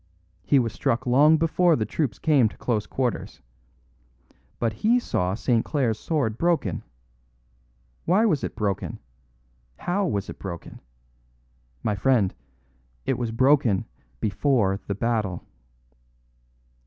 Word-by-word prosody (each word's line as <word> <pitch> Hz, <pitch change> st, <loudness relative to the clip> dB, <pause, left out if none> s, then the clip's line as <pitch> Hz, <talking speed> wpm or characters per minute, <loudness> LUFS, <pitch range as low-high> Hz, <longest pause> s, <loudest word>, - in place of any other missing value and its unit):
He 140 Hz, -, +3 dB
was 115 Hz, -4 st, +1 dB
struck 115 Hz, +7 st, -1 dB
long 145 Hz, +6 st, +5 dB
before 165 Hz, +1 st, +3 dB
the 110 Hz, -, -1 dB
troops 110 Hz, -2 st, -2 dB
came 140 Hz, -8 st, +3 dB
to -, -, -16 dB
close 110 Hz, -4 st, -1 dB
quarters. 125 Hz, -3 st, -3 dB, 1.2 s
But 115 Hz, -2 st, -1 dB
he 220 Hz, -, +2 dB
saw 95 Hz, -, -1 dB
St. 115 Hz, +2 st, +1 dB
Clare's 120 Hz, -7 st, 0 dB
sword 125 Hz, -9 st, -1 dB
broken. 165 Hz, -, +1 dB, 1.2 s
Why 195 Hz, +6 st, +3 dB
was 160 Hz, -11 st, +1 dB
it -, -, -4 dB
broken? 100 Hz, -4 st, -2 dB, 0.8 s
How 190 Hz, +2 st, -1 dB
was 100 Hz, -, -2 dB
it -, -, -9 dB
broken? 85 Hz, -4 st, -8 dB, 1.0 s
My 105 Hz, -, +1 dB
friend, 105 Hz, -1 st, +2 dB, 0.7 s
it -, -, 0 dB
was 120 Hz, -2 st, -1 dB
broken 130 Hz, -3 st, +3 dB, 0.3 s
before 105 Hz, -3 st, +1 dB
the 100 Hz, -, -2 dB
battle." 105 Hz, -5 st, -1 dB
120 Hz, 120 wpm, -25 LUFS, 105-150 Hz, 1.2 s, long